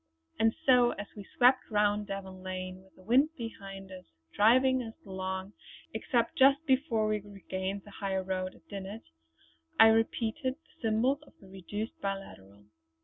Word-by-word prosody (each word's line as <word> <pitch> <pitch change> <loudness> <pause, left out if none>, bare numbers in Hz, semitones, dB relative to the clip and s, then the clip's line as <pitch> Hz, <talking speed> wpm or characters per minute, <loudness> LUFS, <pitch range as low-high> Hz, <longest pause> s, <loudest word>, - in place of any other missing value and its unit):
And 225 0 +3
so 250 -2 +5
as 205 - -6
we 205 -2 -9
swept 255 +1 +5
round 210 -1 +2
Davan 190 -1 -6
Lake, 185 0 -5
with 190 0 -21
the 185 - -18
wind 260 +9 +4
behind 195 -5 -8
us 185 -1 -10 0.3
driving 255 +4 +5
us 225 -2 -7
along 190 +1 -4 0.4
except 230 +2 0
just 275 +3 +6
before 260 -6 +2
we 215 0 +1
regained 195 -1 -5
the 205 - -14
high 195 -1 -2
road 185 0 -2
at - - -22
Dinnet, 200 +2 -7 0.8
I 225 0 +10
repeated 230 +4 +1
the 320 - -31
symbols 240 +6 +1
of - - -19
the 195 - -16
reduced 205 +4 -6
biliteral. 105 - -6
205 Hz, 155 wpm, -31 LUFS, 190-235 Hz, 0.8 s, I